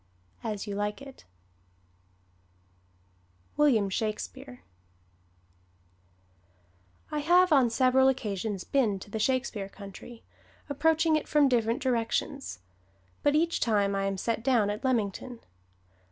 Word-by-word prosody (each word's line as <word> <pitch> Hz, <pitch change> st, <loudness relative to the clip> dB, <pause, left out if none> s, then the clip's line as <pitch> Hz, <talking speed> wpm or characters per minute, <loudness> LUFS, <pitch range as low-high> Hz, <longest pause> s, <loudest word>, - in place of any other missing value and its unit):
As 215 Hz, -3 st, -4 dB
You 205 Hz, -, -5 dB
Like 205 Hz, +1 st, -2 dB
It 275 Hz, -1 st, -13 dB
[Illustration: -, -, -36 dB, 2.3 s
WILLIAM 240 Hz, -10 st, +3 dB
SHAKESPEARE] 250 Hz, +5 st, -4 dB, 2.5 s
I 300 Hz, -, -1 dB
have 350 Hz, +3 st, +4 dB
on 260 Hz, -4 st, +5 dB
several 255 Hz, +2 st, +3 dB
occasions 210 Hz, -6 st, -2 dB
been 230 Hz, -8 st, +1 dB
to 195 Hz, +2 st, -12 dB
the 220 Hz, -, -3 dB
Shakespeare 245 Hz, -5 st, -1 dB
country, 200 Hz, +4 st, -11 dB, 0.4 s
approaching 315 Hz, +2 st, +2 dB
it 310 Hz, -, -1 dB
from 295 Hz, -2 st, +4 dB
different 235 Hz, -1 st, +1 dB
directions, 240 Hz, -, -1 dB, 0.6 s
but 290 Hz, 0 st, +2 dB
each 335 Hz, +2 st, +1 dB
time 205 Hz, -3 st, +1 dB
I 195 Hz, 0 st, -1 dB
am 195 Hz, 0 st, -2 dB
set 230 Hz, +4 st, -2 dB
down 235 Hz, -6 st, +2 dB
at 210 Hz, +4 st, -6 dB
Leamington. 240 Hz, -1 st, -2 dB
240 Hz, 115 wpm, -28 LUFS, 210-275 Hz, 2.5 s, on